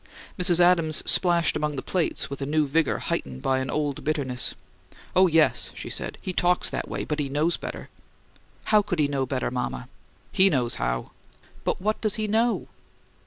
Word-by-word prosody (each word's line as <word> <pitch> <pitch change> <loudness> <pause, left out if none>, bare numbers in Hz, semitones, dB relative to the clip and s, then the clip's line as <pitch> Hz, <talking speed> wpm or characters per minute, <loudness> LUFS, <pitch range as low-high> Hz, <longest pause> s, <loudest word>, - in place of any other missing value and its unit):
Mrs. 175 -1 +5
Adams 170 -3 +3
splashed 170 -2 +3
among 150 -1 -1
the 135 - -4
plates 180 -4 -1
with 140 0 -7
a 135 - -2
new 155 +1 +2
vigour 155 +2 +1
heightened 65 -1 -4
by 130 0 +1
an 130 -1 -3
old 145 -1 -2
bitterness. 135 -5 -1 0.6
"Oh, 185 0 +6
yes," 160 -2 +2
she - - -7
said. - - -4
"He 185 - -3
talks 180 0 +1
that - - -3
way; - - -3
but 150 0 -3
he 140 -2 -1
knows 155 +5 +1
better." - - -7 0.8
"How 215 -1 +4
could 185 -3 -3
he 150 -2 +2
'know 135 -2 -1
better,' 130 -1 -2
mama?" 125 0 -4 0.4
"HE 195 0 +5
knows 125 -6 0
how!" - - -2 0.5
"But - - -1
what 215 +3 -1
does 215 -3 +1
he 215 -1 -2
know?" 225 +3 +1
155 Hz, 185 wpm, -25 LUFS, 135-180 Hz, 0.8 s, Oh